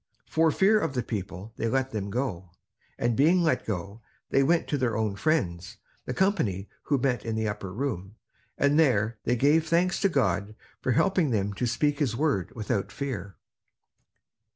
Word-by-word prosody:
For 160 0 +2
fear 200 +7 +4
of 140 - -2
the 125 - 0
people, 100 0 -6
they 115 - -1
let 130 +3 0
them 100 -2 -3
go. 100 -6 -3 0.5
And 120 -1 0
being 170 +7 +4
let 160 - +1
go, 100 +2 -4 0.3
they 135 - +4
went 165 +5 +2
to 145 - +1
their 125 -4 0
own 110 -3 -1
friends, 90 - -1 0.3
the 125 - -3
company 135 - +1 0.2
who 145 - +2
met 125 -4 0
in 115 -1 -3
the 110 0 0
upper 105 -3 -4
room, 105 -4 -4 0.4
and 140 +2 +3
there 115 -7 +2
they 120 - +2
gave 150 +6 +3
thanks 175 +3 +2
to 195 - +4
God 110 - 0 0.3
for 130 - +1
helping 185 - +2
them 100 -3 0
to 120 +5 -1
speak 145 +5 0
his 130 -7 0
word 125 - 0
without 105 -3 -2
fear. 100 -8 -5
120 Hz, 175 wpm, -27 LUFS, 105-145 Hz, 0.5 s, fear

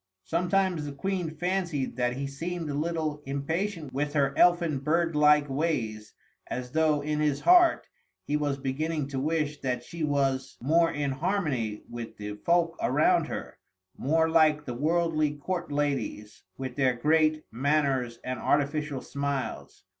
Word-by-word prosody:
Sometimes 180 - +1
the 145 - -5
Queen 180 +3 -2
fancied 175 -7 -1
that 125 -1 +1
he 140 - -2
seemed 165 +3 -4
a - - -3
little 155 0 -2
impatient 160 +2 -3
with 145 +2 -1
her 140 -2 +1
elfin 170 -5 +4
bird 165 +3 +1
like 150 0 +5
ways, 120 -8 -2 0.3
as 125 0 -5
though, 155 -1 +2
in 150 +1 -2
his 150 -2 +1
heart, 355 -1 +5 0.4
he 145 - -1
was 145 -2 0
beginning 145 +2 -2
to 135 -2 -3
wish 150 0 -1
that 125 -2 -2
she 170 +5 -6
was 135 -2 0
more 165 +6 +3
in 145 -1 -1
harmony 135 - -1
with 115 -1 -7
the 105 0 -5
folk 170 +4 +2
around - - +3
her, - - -6 0.4
more 160 +4 +2
like 155 -2 +3
the 125 - -4
worldly 155 +2 +1
court 175 +3 -4
ladies, 140 -7 -2 0.2
with 130 -2 -5
their 130 -3 +3
great 155 +3 +2
manners 135 -2 0
and 130 0 -3
artificial 145 -1 0
smiles. 140 -1 -4
150 Hz, 150 wpm, -28 LUFS, 135-165 Hz, 0.4 s, like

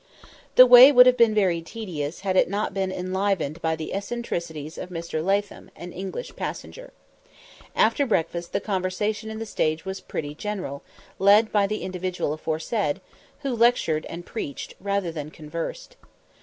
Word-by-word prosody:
The 255 - +10
way 250 +2 +10
would 250 -2 +8
have 255 0 +6
been 230 -3 +4
very 185 -5 +2
tedious 165 -6 -6
had 190 -1 -1
it - - +4
not 205 +1 -2
been 190 -1 -1
enlivened 185 -4 -2
by 160 0 0
the 160 -1 -6
eccentricities 170 -8 -4
of 180 - -6
Mr. 165 -2 -4
Latham, 200 +2 -1
an 175 0 -9
English 195 - -6
passenger. - - -7 0.8
After 285 -2 +3
breakfast 170 -4 -1
the 200 - -1
conversation 205 +3 -2
in 220 - -6
the 225 - -5
stage 155 -6 -1
was 190 0 -5
pretty 145 -1 -5
general, 185 -5 -5 0.4
led 205 +3 +5
by 205 -2 +3
the 215 +1 -3
individual 185 -4 -3
aforesaid, 160 +2 -2 0.4
who 275 -3 -2
lectured 230 -10 +2
and 175 +1 -8
preached, 145 -11 -6
rather 200 -3 -1
than 150 -2 -6
conversed. 165 - -7
190 Hz, 155 wpm, -24 LUFS, 165-215 Hz, 0.8 s, The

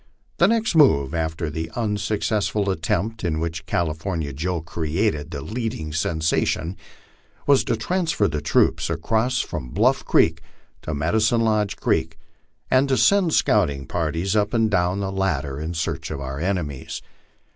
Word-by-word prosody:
The 175 - +5
next 225 -1 +1
move, 85 - +4
after 80 0 -2
the 80 +2 -4
unsuccessful 105 -2 0
attempt 100 +6 -2
in 80 -3 0
which 85 0 -4
California 80 -2 -2
Joe 85 +5 -2
created 80 0 -1
the 70 -4 -5
leading 110 -10 -4
sensation, 80 +2 0 0.7
was 140 -2 +5
to 120 - +1
transfer 160 - 0
the 75 -2 -3
troops 80 - +2
across 110 +10 0
from 60 - -5
Bluff - - +2
creek - - +3 0.4
to 75 - -4
Medicine 110 +10 +2
Lodge 110 -3 +1
creek, 80 0 0 0.5
and 130 +2 +4
to 130 - +2
send 180 - +4
scouting 70 -1 +2
parties 85 +4 -1
up 105 +2 +1
and 110 -1 +2
down 90 +1 +1
the 95 -1 -2
latter 75 -8 -1
in 80 +3 -4
search 85 - -3
of 75 - -4
our 70 0 -5
enemies. 80 -7 -3
90 Hz, 145 wpm, -23 LUFS, 80-110 Hz, 0.7 s, The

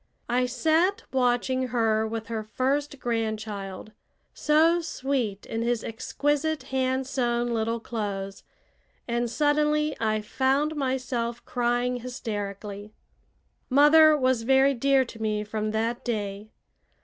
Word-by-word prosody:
I 250 +1 +2
sat 320 - +1
watching 255 0 +1
her 220 -2 +1
with 225 0 -4
her 225 0 -3
first 275 +6 -1
grandchild, 215 -4 -3 0.4
so 325 +3 +3
sweet 260 -10 -2
in 225 - -3
his 235 -1 0
exquisite 290 +7 -1
hand 260 0 0
sewn 240 -2 0
little 230 +1 -1
clothes, 200 -4 -4 0.7
and 240 0 -1
suddenly 300 +3 +1
I 215 -1 0
found 270 +7 0
myself 255 -4 -2
crying 245 0 0
hysterically. 210 -4 -6 0.7
Mother 300 +3 +7
was 255 -3 +2
very 265 +3 +4
dear 270 +1 +3
to 225 -2 -11
me 210 -1 -1
from 215 0 -3
that 225 +2 -1
day. 210 -3 -3
240 Hz, 115 wpm, -26 LUFS, 220-270 Hz, 0.7 s, Mother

